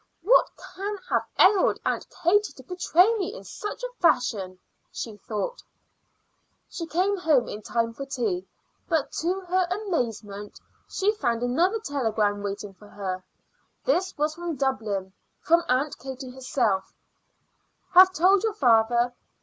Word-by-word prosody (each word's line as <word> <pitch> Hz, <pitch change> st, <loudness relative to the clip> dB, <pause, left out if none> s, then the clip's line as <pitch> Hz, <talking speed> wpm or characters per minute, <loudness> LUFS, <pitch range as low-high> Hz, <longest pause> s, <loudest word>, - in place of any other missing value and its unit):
"What 485 Hz, +7 st, +5 dB, 0.2 s
can 405 Hz, +2 st, -4 dB
have -, -, +1 dB
ailed 385 Hz, 0 st, +5 dB
Aunt -, -, -1 dB, 0.2 s
Katie 410 Hz, +5 st, +3 dB
to -, -, -14 dB
betray 360 Hz, +3 st, +3 dB
me 410 Hz, +2 st, -3 dB
in -, -, -9 dB
such 420 Hz, +4 st, -7 dB
a -, -, -3 dB
fashion?" 200 Hz, -, +1 dB, 0.3 s
she 225 Hz, -3 st, -6 dB
thought. 215 Hz, -, -4 dB, 1.1 s
She 335 Hz, -, -6 dB
came 370 Hz, +6 st, +1 dB
home 305 Hz, -, +2 dB
in 210 Hz, -, -6 dB
time 230 Hz, +1 st, -1 dB
for 275 Hz, +4 st, -7 dB
tea; 215 Hz, -9 st, -2 dB, 0.4 s
but, 320 Hz, -4 st, +1 dB
to 365 Hz, +4 st, -1 dB
her 365 Hz, 0 st, 0 dB
amazement 230 Hz, -, -3 dB, 0.3 s
she 405 Hz, +2 st, +1 dB
found 240 Hz, -, -1 dB
another 335 Hz, -, +2 dB
telegram 220 Hz, -, 0 dB
waiting 200 Hz, 0 st, -5 dB
for 210 Hz, +2 st, -17 dB
her. 190 Hz, -2 st, -5 dB, 0.6 s
This 375 Hz, -6 st, +1 dB
was 300 Hz, +1 st, 0 dB
from 340 Hz, -1 st, -4 dB
Dublin, 215 Hz, -8 st, -2 dB, 0.3 s
from 335 Hz, +1 st, +3 dB
Aunt 265 Hz, +4 st, +1 dB
Katie 265 Hz, 0 st, -7 dB
herself: 250 Hz, -6 st, -1 dB, 1.0 s
"Have 370 Hz, +1 st, +8 dB
told 375 Hz, +2 st, +4 dB
your 440 Hz, -1 st, -1 dB
father. 240 Hz, -, +3 dB
275 Hz, 140 wpm, -26 LUFS, 220-370 Hz, 1.1 s, Have